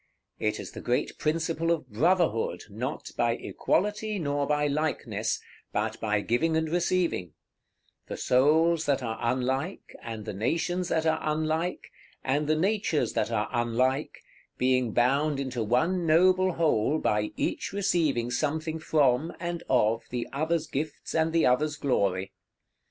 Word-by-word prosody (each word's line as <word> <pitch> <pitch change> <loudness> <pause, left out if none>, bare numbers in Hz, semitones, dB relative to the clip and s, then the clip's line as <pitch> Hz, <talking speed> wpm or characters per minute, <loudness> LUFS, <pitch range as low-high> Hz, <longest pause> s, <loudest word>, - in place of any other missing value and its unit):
It 105 -1 -1
is - - -7
the - - -8
great 120 +1 -1
principle 165 +1 0
of 165 -6 0
Brotherhood, 130 - +1
not 125 +8 -4
by 120 -1 +2
equality, 210 - -1
nor 145 -4 -1
by 150 0 +1
likeness, 150 +2 -1 0.3
but - - -2
by 105 -2 0
giving 160 +10 +1
and 160 0 0
receiving; 170 - 0 0.7
the - - -5
souls 160 +5 +3
that 140 -2 +1
are 110 -2 -3
unlike, 130 +8 -2
and 110 -2 -6
the - - -4
nations 170 - -1
that 160 -1 0
are 160 0 +2
unlike, 155 +3 -1 0.3
and 145 +3 0
the 155 - +3
natures 190 -2 0
that - - 0
are 110 -2 0
unlike, 125 +4 0 0.3
being 125 -2 +2
bound 140 +5 +2
into 130 -4 -2
one 165 - +1
noble 185 +3 +4
whole 155 -4 +2
by 105 -6 0
each - - -2
receiving 160 -11 +1
something 155 +4 -1
from, 150 -1 +2
and 170 0 -3
of, 115 -2 +2
the 120 -1 -3
others' 160 +3 0
gifts 155 +1 -4
and 160 0 +2
the 165 0 +3
others' 150 +5 +2
glory. 100 -10 0
150 Hz, 145 wpm, -28 LUFS, 125-165 Hz, 0.7 s, noble